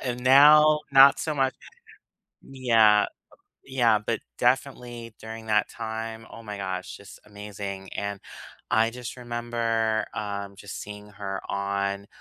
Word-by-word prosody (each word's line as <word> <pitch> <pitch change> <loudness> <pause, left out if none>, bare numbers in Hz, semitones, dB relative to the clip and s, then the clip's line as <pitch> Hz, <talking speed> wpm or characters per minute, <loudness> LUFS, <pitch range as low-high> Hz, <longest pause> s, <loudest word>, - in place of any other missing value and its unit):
And 125 -1 -3
now 150 +3 +7
not 135 0 +7
so 155 - -2
mu 135 -1 +2 1.0
yeah, 115 -5 +4 0.6
yeah. 120 -5 +2
But 110 +1 -3 0.2
definitely 120 -2 -1
during 110 0 -9
that 105 -1 +2
time, 115 0 -6
oh 115 - -11
my 105 -2 -7
gosh, 95 -2 -5
just 100 0 -13
amazing 100 -2 -8
and 100 -1 -4 0.5
I 115 +1 +3
just 125 +1 -8
remember, 115 -2 -1
um, 100 -2 -5
just 100 0 -8
seeing 105 0 -10
her 100 -1 -6
on, 100 0 -2
110 Hz, 130 wpm, -26 LUFS, 100-120 Hz, 1.0 s, now